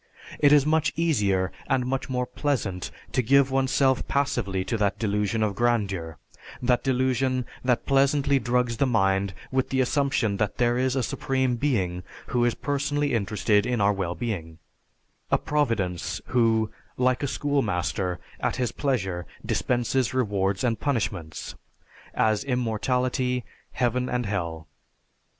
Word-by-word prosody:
It 145 -1 +5
is 145 -2 +6
much 155 0 +2
easier 100 - +1 0.2
and 130 -2 +2
much 135 +1 -2
more 125 -1 0
pleasant 125 -9 -2 0.2
to 130 - +2
give 135 +3 +4
oneself 130 0 +2
passively 100 -9 0
to 115 - -1
that 100 -2 +1
delusion 105 0 0
of 105 -2 0
grandeur, 100 -8 0 0.4
that 125 -1 +1
delusion 130 -1 +1 0.2
that 125 -2 +1
pleasantly 140 0 +3
drugs 120 0 0
the 140 - +2
mind 95 -5 +1 0.2
with 130 -1 0
the 135 - 0
assumption 130 -5 +1
that 105 -1 -1
there 120 0 +2
is 130 0 +1
a 130 - +1
supreme 130 +1 0
being 100 -10 0 0.3
who 120 -1 +3
is 120 - +1
personally 145 +1 -1
interested 105 -1 +1
in 125 -2 0
our 100 0 +3
well 95 -3 -2
being; 90 -9 -4 0.7
a - - +4
providence 115 - -1
who, 115 -3 +2 0.3
like 125 0 +2
a 140 - 0
school 145 +1 0
master, 90 -3 -1 0.2
at - - -1
his 125 -2 -1
pleasure 95 -11 -2 0.2
dispenses 125 +1 0
rewards 100 -5 0
and 115 -3 +1
punishments; 100 - -2 0.6
as 110 -1 +2
immortality, 125 0 0 0.3
Heaven 125 0 0
and 125 -1 -1
Hell. 85 -6 -3
120 Hz, 140 wpm, -26 LUFS, 100-130 Hz, 0.7 s, is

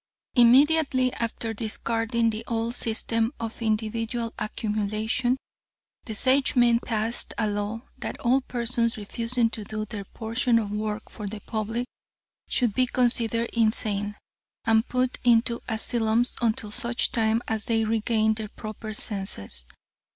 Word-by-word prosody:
"Immediately 260 +1 +5
after 230 -1 -2
discarding 225 +1 0
the 220 +1 -5
old 230 0 -1
system 230 +1 0
of 230 +1 -5
individual 225 +1 -1
accumulation, 215 +4 -1 0.7
the 220 - -5
Sagemen 250 -1 +4
passed 225 0 -1
a 220 - +1
law 205 +2 -3 0.2
that - - -5
all 260 +3 +3
persons 235 -2 0
refusing 230 +3 +1
to 220 - -5
do 215 +1 -4
their 205 -2 -6
portion 230 +3 0
of 210 -3 -1
work 210 +1 -2
for 210 -3 -6
the 210 +1 -6
public 225 +3 -3 0.6
should 240 -5 +1
be 255 +2 +2
considered 235 -2 +1
insane, 210 -2 +1 0.5
and 225 0 +3
put 255 0 0
into 235 -1 +3
asylums 225 +1 +2
until 220 -2 0
such 235 +3 0
time 220 -1 +2
as 220 -1 -1
they 225 -2 +1
regained 220 0 +1
their 215 -2 -5
proper 215 0 -7
senses. 100 - -3
225 Hz, 130 wpm, -26 LUFS, 215-240 Hz, 0.7 s, Immediately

